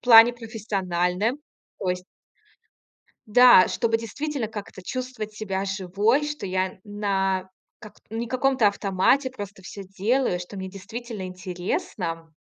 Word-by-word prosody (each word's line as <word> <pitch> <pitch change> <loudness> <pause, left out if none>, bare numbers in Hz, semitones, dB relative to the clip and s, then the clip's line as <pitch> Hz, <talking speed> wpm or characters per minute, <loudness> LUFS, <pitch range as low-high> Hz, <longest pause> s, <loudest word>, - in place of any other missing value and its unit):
в - - -20
плане 235 0 +9
профессиональном. 205 -1 -1 0.4
То 185 - -3
есть 180 0 -1 1.2
Да, 245 -3 +8
чтобы 225 -1 +1
действительно 255 +2 -3
как-то 205 -3 -8
чувствовать 250 -1 -5
себя 195 -3 -3
живой, 200 +7 +1
что 295 -7 -4
я 185 0 -1
на 195 -2 -1 0.3
как 210 -2 -11 0.2
не 225 +2 -3
каком-то 255 -1 +3
автомате 200 +7 +2
просто 205 -5 -8
всё 195 +2 -8
делаю, 195 +2 0
что 180 +3 -8
мне 190 0 -5
действительно 220 +3 -7
интересно. 180 -2 -4
205 Hz, 125 wpm, -25 LUFS, 185-235 Hz, 1.2 s, плане